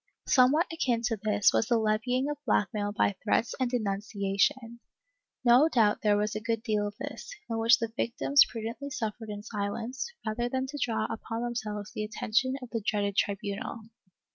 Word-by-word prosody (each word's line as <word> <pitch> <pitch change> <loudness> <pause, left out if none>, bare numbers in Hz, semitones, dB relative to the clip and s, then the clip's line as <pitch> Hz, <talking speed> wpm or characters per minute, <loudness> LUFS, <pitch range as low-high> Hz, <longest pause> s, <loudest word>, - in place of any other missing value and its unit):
Somewhat 270 +5 +4
akin 245 -7 0
to 225 -1 0
this 210 -2 +3
was 220 - +2
the 235 - +3
levying 225 +5 +1
of 295 0 -5
blackmail 205 -3 0
by 205 -1 +1
threats 225 +2 +1
of 255 -2 +1
denunciation. 210 +1 -1 0.7
No 250 +6 +6
doubt 220 -7 +3
there 210 -1 +3
was 210 +1 0
a 215 - -2
good 225 0 -2
deal 210 -3 0
of 205 - -7
this, - - -7 0.2
in 225 -1 -2
which 230 +1 +6
the 230 -1 -4
victims 275 +4 +3
prudently 230 +5 -5
suffered 225 -4 -4
in 205 0 -6
silence, 230 - -4
rather 240 +3 -1
than 260 +1 -1
to 290 +2 -7
draw 220 -2 0
upon 225 +1 -4
themselves 215 -4 -4
the 215 - -3
attention 225 +4 0
of 245 - -10
the 230 - -2
dreaded 200 -1 0
tribunal. 200 +3 -2
225 Hz, 175 wpm, -29 LUFS, 210-245 Hz, 0.7 s, No